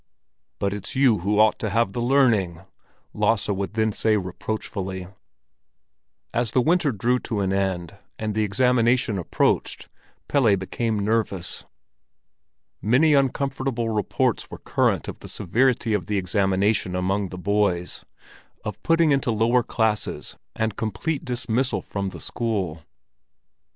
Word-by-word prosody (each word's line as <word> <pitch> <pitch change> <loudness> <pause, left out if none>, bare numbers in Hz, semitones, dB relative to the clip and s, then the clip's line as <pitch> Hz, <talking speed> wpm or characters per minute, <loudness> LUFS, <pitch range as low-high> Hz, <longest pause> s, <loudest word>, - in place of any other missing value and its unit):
"But 100 0 -1
it's 105 +4 -5
you 130 -6 +4
who 100 +4 0
ought 110 0 +4
to 110 - -1
have 110 -1 +1
the 120 - -2
learning," 115 -10 +2 0.5
Lasse 105 -1 +1
would 100 +1 -2
then 110 -1 +2
say 110 +1 +2
reproachfully. 95 -1 -4 1.3
As 120 -1 0
the 130 - +4
winter 160 +1 +2
drew 120 +4 +1
to 110 -4 -3
an 95 0 0
end, 95 -4 -1 0.2
and 110 -1 -3
the 110 +1 +1
examination 120 0 +2
approached, 85 - 0 0.4
Pelle 120 -8 +4
became 110 +4 -2
nervous. 100 -4 -1 1.2
Many 130 +8 +4
uncomfortable 135 -3 0
reports 105 -3 0
were - - -8
current - - 0
of - - -7
the - - -10
severity 120 +3 +1
of 95 -5 -1
the 105 - 0
examination 95 +1 +1
among 95 +2 0
the 90 - -7
boys—of 90 -2 -3
putting 165 -2 +3
into 135 -3 +1
lower 115 +3 +3
classes 110 -3 -1 0.2
and 110 -2 -1
complete 115 - -2
dismissal 125 -1 -1
from 100 -1 -3
the - - -10
school. 95 -9 -3
110 Hz, 130 wpm, -24 LUFS, 95-120 Hz, 1.3 s, you